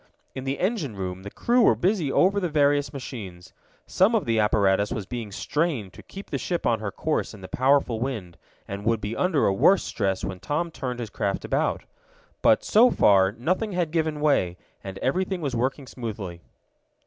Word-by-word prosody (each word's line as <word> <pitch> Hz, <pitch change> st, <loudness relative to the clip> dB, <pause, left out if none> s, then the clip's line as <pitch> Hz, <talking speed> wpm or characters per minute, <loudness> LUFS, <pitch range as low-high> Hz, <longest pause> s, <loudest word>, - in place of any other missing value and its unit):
In 130 Hz, -, -6 dB
the 135 Hz, +1 st, -1 dB
engine 185 Hz, -, -1 dB
room 95 Hz, -1 st, -5 dB
the 100 Hz, -, -7 dB
crew 240 Hz, -, +1 dB
were -, -, +5 dB
busy 180 Hz, -6 st, 0 dB
over 195 Hz, +6 st, +3 dB
the 180 Hz, -3 st, -1 dB
various 145 Hz, -1 st, +2 dB
machines. 105 Hz, -10 st, -8 dB, 0.3 s
Some 200 Hz, +5 st, +3 dB
of 215 Hz, -, +1 dB
the 115 Hz, -2 st, +1 dB
apparatus 100 Hz, -1 st, +2 dB
was 105 Hz, -, -3 dB
being 115 Hz, -1 st, -6 dB
strained 140 Hz, -, -2 dB
to -, -, -12 dB
keep 195 Hz, +1 st, -11 dB
the -, -, -1 dB
ship 175 Hz, -2 st, -2 dB
on 115 Hz, -2 st, +2 dB
her 105 Hz, -2 st, -3 dB
course 155 Hz, -4 st, -2 dB
in 100 Hz, -, -13 dB
the 95 Hz, -, -8 dB
powerful 130 Hz, -2 st, +2 dB
wind, 110 Hz, -9 st, -4 dB, 0.3 s
and 100 Hz, +1 st, -6 dB
would 115 Hz, 0 st, +1 dB
be 105 Hz, +2 st, -4 dB
under 180 Hz, -6 st, +2 dB
a 95 Hz, -, +3 dB
worse 185 Hz, -, +4 dB
stress 95 Hz, -3 st, -2 dB
when 95 Hz, -2 st, -5 dB
Tom 160 Hz, -, -2 dB
turned 125 Hz, -5 st, -5 dB
his 115 Hz, -3 st, -5 dB
craft 100 Hz, -1 st, -2 dB
about. -, -, 0 dB, 0.6 s
But, -, -, +4 dB
so 235 Hz, +4 st, +5 dB
far, 95 Hz, -, +4 dB
nothing 185 Hz, -, -1 dB
had 175 Hz, -3 st, -1 dB
given 155 Hz, -2 st, -1 dB
way, 95 Hz, -, +2 dB, 0.3 s
and 95 Hz, -1 st, -7 dB
everything 185 Hz, +7 st, 0 dB
was 140 Hz, -6 st, -3 dB
working 130 Hz, +4 st, -1 dB
smoothly. 105 Hz, -9 st, -6 dB
130 Hz, 195 wpm, -25 LUFS, 100-165 Hz, 0.6 s, were